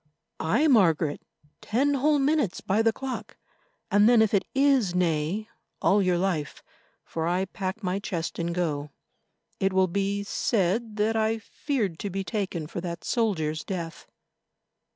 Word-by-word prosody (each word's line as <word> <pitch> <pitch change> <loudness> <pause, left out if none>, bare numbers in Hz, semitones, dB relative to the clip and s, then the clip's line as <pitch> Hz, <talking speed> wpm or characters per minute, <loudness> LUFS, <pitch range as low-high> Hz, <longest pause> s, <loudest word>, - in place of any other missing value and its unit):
"Aye, 165 - +2
Margaret, 165 - +3 0.4
ten 275 +6 +1
whole 290 +2 +3
minutes 280 - +1
by 200 +3 +1
the 225 0 +4
clock, 265 +3 -6 0.5
and 205 +2 +6
then 235 -2 +6
if 220 - 0
it 200 - +2
is 265 -9 +3
nay, 175 +4 0 0.3
all 200 +1 +3
your 180 -2 +2
life, 175 -6 -2 0.4
for 160 0 -3
I 180 +2 +1
pack 190 +3 -5
my 185 +1 -1
chest 175 -5 -4
and 170 0 -1
go. 155 -4 -2 0.7
It 195 0 +1
will 190 0 +4
be 200 +2 -1
said 210 +2 0
that 215 +1 +1
I 220 0 +1
feared 220 - -3
to 205 - -3
be 195 +1 -3
taken 185 -4 -3
for 170 +2 -5
that 170 -1 -5
soldier's 160 -10 0
death." 170 -4 -5
195 Hz, 150 wpm, -26 LUFS, 170-225 Hz, 0.7 s, and